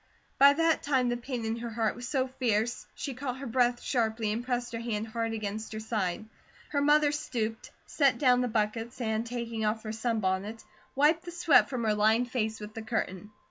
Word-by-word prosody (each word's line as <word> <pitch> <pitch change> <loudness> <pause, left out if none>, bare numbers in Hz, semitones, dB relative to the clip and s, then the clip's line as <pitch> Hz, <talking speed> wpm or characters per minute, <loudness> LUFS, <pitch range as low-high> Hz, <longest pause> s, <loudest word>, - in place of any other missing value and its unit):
By 280 +1 +8
that 330 +1 +2
time 260 -4 +1
the 240 - 0
pain 240 -1 -4
in 225 +1 -1
her 235 0 -5
heart 225 -1 -1
was 245 +1 -7
so 260 -1 +1
fierce 240 -3 -1
she 275 - -4
caught 255 0 -4
her 275 - -7
breath 245 0 +1
sharply, 225 -3 0
and 225 +3 -2
pressed 245 -1 -2
her 230 - -3
hand 225 -2 -3
hard 230 0 -2
against 215 0 -4
her 215 - -4
side. 215 -3 -2 0.4
Her 285 - 0
mother 295 0 +4
stooped, 235 -7 -3 0.2
set 275 -5 +2
down 250 -1 +4
the 250 - +1
buckets, 225 +2 -2
and 220 -2 0
taking 235 -2 -4
off 215 +1 0
her 215 - -4
sunbonnet, 215 -2 -1 0.3
wiped 310 +5 +3
the 345 - -6
sweat 345 -3 +4
from 250 -3 -3
her 215 -1 +2
lined 220 +4 +2
face 220 -3 -1
with 210 0 -8
the 225 - -6
curtain. 210 -3 -3
235 Hz, 205 wpm, -29 LUFS, 220-255 Hz, 0.4 s, By